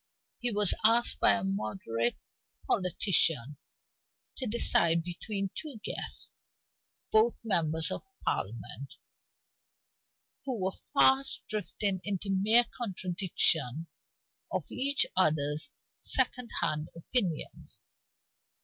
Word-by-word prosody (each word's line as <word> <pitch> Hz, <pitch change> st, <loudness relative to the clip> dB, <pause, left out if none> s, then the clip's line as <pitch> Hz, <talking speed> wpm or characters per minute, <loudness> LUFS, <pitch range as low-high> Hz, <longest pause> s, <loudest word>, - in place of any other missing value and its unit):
He 245 Hz, -, -1 dB
was 205 Hz, -3 st, +5 dB
asked 230 Hz, +2 st, +3 dB
as 100 Hz, -1 st, +6 dB
a -, -, -6 dB
moderate 110 Hz, +4 st, -2 dB, 0.5 s
politician 165 Hz, -, +2 dB, 0.8 s
to 260 Hz, -, -1 dB
decide 170 Hz, -7 st, +4 dB
between 195 Hz, +3 st, -4 dB
two 290 Hz, -8 st, -8 dB
guests, -, -, -3 dB, 0.8 s
both 220 Hz, +2 st, +4 dB
members 160 Hz, -6 st, +1 dB
of -, -, -4 dB, 0.2 s
Parliament, 115 Hz, +5 st, -4 dB, 1.5 s
who 255 Hz, -5 st, -4 dB
were 190 Hz, 0 st, -2 dB, 0.2 s
fast 270 Hz, 0 st, +3 dB
drifting 205 Hz, -3 st, -3 dB
into 200 Hz, -1 st, -3 dB
mere 215 Hz, +5 st, +4 dB
contradiction 175 Hz, -, 0 dB, 0.7 s
of -, -, -2 dB
each 275 Hz, +2 st, +1 dB
other's 150 Hz, -4 st, +1 dB, 0.3 s
second 250 Hz, -2 st, +2 dB
hand 150 Hz, +1 st, -1 dB
opinions. 170 Hz, -, -3 dB
190 Hz, 95 wpm, -30 LUFS, 155-225 Hz, 1.5 s, as